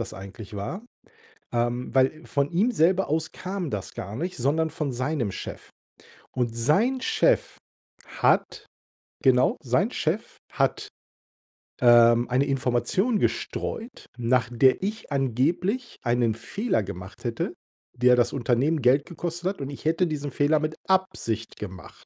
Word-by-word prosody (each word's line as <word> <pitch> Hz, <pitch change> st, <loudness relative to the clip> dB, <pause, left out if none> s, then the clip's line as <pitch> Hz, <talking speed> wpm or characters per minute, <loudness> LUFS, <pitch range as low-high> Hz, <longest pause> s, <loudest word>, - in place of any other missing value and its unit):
das 115 Hz, -, -5 dB
eigentlich 100 Hz, +2 st, -10 dB
war, 160 Hz, -, -5 dB, 0.7 s
ähm, 120 Hz, +2 st, -1 dB
weil 135 Hz, +4 st, +2 dB
von 140 Hz, 0 st, 0 dB
ihm 195 Hz, +8 st, +2 dB
selber 185 Hz, 0 st, +3 dB
aus 160 Hz, +1 st, -1 dB
kam 185 Hz, -4 st, -4 dB
das 100 Hz, -4 st, -5 dB
gar 100 Hz, +3 st, -6 dB
nicht, 175 Hz, +7 st, -3 dB
sondern 155 Hz, +6 st, +1 dB
von 150 Hz, -4 st, -3 dB
seinem 125 Hz, -2 st, -1 dB
Chef. -, -, -8 dB, 0.6 s
Und 120 Hz, -3 st, -1 dB
sein 195 Hz, -, +2 dB
Chef 445 Hz, -, +2 dB, 0.5 s
hat -, -, +1 dB, 0.6 s
genau, 130 Hz, -1 st, +4 dB
sein -, -, +1 dB
Chef -, -, -2 dB
hat, -, -, 0 dB, 0.9 s
ähm, 120 Hz, 0 st, +6 dB
eine 130 Hz, +3 st, +2 dB
Information 135 Hz, -, +1 dB
gestreut, 235 Hz, +3 st, -3 dB
nach 120 Hz, 0 st, +1 dB
der 130 Hz, +2 st, +4 dB
ich 210 Hz, -2 st, -4 dB
angeblich 155 Hz, -, 0 dB
einen 120 Hz, -2 st, +2 dB
Fehler 115 Hz, -, -1 dB
gemacht 95 Hz, +2 st, -9 dB
hätte, 115 Hz, -1 st, -2 dB, 0.4 s
der 125 Hz, +1 st, +5 dB
das 120 Hz, -1 st, +2 dB
Unternehmen 135 Hz, +5 st, +1 dB
Geld 130 Hz, +4 st, +4 dB
gekostet 175 Hz, +1 st, -3 dB
hat 195 Hz, -, -6 dB
und 135 Hz, -, -4 dB
ich 140 Hz, -, -9 dB
hätte 165 Hz, +3 st, +2 dB
diesen 145 Hz, -2 st, -4 dB
Fehler 145 Hz, +4 st, +2 dB
mit 155 Hz, +1 st, -2 dB
Absicht 150 Hz, -, -1 dB
gemacht. 95 Hz, -2 st, -10 dB
135 Hz, 140 wpm, -25 LUFS, 120-175 Hz, 0.9 s, ähm